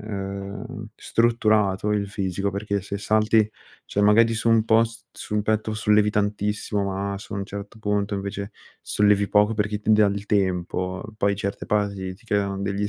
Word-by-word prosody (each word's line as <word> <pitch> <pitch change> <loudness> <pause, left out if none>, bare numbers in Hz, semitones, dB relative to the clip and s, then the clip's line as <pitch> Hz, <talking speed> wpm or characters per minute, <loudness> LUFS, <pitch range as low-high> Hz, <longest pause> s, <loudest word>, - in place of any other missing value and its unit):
ehm, 100 0 -6
strutturato 105 -3 +2
il 100 -1 0
fisico, 100 -1 -2
perché 100 0 -2
se 100 +1 -5
salti 110 +1 +3 0.4
cioè 100 - -2
magari 115 +2 +5
su 115 +1 0
un 115 -1 +4
post 115 0 +1
sul 105 0 -3
petto 110 0 0
sollevi 105 -1 +3
tantissimo, 105 0 -1
ma 100 0 -2
su 100 - -10
un 100 - -3
certo 100 +2 -8
punto 105 -1 -1
invece 100 +1 -4 0.3
sollevi 105 -1 +2
poco 105 +1 +3
perché 105 0 -1
ti 110 +1 +2
dà 105 -1 +5
il 100 +1 -2
tempo. 90 -1 -1
Poi 100 -1 +1
certe 100 0 -4
parti 100 -3 -1
ti 105 +6 -22
creano 100 -2 0
degli 100 +1 -1
105 Hz, 165 wpm, -24 LUFS, 100-105 Hz, 0.4 s, magari